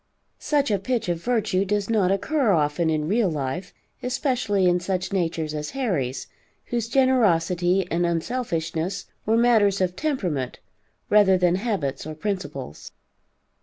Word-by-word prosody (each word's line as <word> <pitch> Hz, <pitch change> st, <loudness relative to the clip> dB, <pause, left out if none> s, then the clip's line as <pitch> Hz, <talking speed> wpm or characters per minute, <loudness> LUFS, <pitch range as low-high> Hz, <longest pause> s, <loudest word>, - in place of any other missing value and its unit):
Such 285 Hz, -5 st, +1 dB
a 200 Hz, -, +1 dB
pitch 235 Hz, -2 st, -2 dB
of 170 Hz, -1 st, -1 dB
virtue 215 Hz, -6 st, +1 dB
does 205 Hz, 0 st, -1 dB
not 210 Hz, -5 st, +2 dB
occur 265 Hz, +6 st, +1 dB
often 160 Hz, -2 st, +2 dB
in 155 Hz, -1 st, 0 dB
real 210 Hz, +1 st, +2 dB
life, 155 Hz, +4 st, -3 dB, 0.3 s
especially 250 Hz, -7 st, 0 dB
in 180 Hz, 0 st, +3 dB
such 180 Hz, +1 st, -3 dB
natures 165 Hz, -4 st, -1 dB
as 150 Hz, 0 st, -4 dB
Harry's, 155 Hz, -, -1 dB, 0.4 s
whose 235 Hz, -2 st, -2 dB
generosity 185 Hz, -8 st, +2 dB
and 170 Hz, +1 st, +1 dB
unselfishness 170 Hz, -1 st, -2 dB, 0.2 s
were 225 Hz, +1 st, +3 dB
matters 220 Hz, -5 st, +4 dB
of 180 Hz, -1 st, 0 dB
temperament 180 Hz, -, -2 dB, 0.5 s
rather 205 Hz, -3 st, +6 dB
than 180 Hz, -1 st, +3 dB
habits 185 Hz, -, -2 dB
or 155 Hz, -, -6 dB
principles. 155 Hz, -, -5 dB
190 Hz, 135 wpm, -24 LUFS, 165-225 Hz, 0.5 s, rather